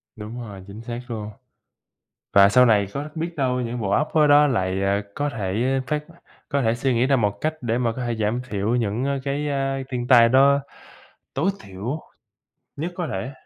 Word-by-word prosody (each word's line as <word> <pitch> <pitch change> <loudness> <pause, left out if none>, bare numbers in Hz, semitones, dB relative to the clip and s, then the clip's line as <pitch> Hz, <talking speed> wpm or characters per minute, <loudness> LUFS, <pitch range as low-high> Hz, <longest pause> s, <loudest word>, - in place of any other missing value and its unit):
Đúng 110 +3 -7
rồi, 100 -5 -9
chính 100 +3 -9
xác 120 +1 -5
luôn. 110 -3 -5 1.0
Và 100 0 +7
sau 125 +4 +6
này 105 -4 +4
có 145 +2 -4
biết 165 +1 -4
đâu 125 -2 0
những 120 0 -3
bộ 100 -3 -2
óc 150 +9 +2
khối 155 -2 +4
đó 145 +1 +7
lại 95 -8 0 0.4
có 145 0 -1
thể 115 +4 -1
phát 150 -1 -2 0.4
có 140 -1 0
thể 115 0 +2
suy 130 +2 0
nghĩ 120 +2 +2
ra 135 0 +3
một 105 -4 0
cách 155 0 0
để 120 -1 -1
mà 120 -2 0
có 130 - -3
thể 120 -1 -2
giảm 110 +3 0
thiểu 105 +3 -1
những 125 +5 -1
cái 140 +2 -2 0.4
thiên 120 -2 -3
tai 120 -2 +7
đó 140 +3 +5 0.7
tối 160 +8 +1
thiểu 100 +10 -5 0.8
nhất 165 +5 -3
có 175 -2 -3
thể. 95 +8 -4
120 Hz, 190 wpm, -23 LUFS, 105-140 Hz, 1.0 s, Và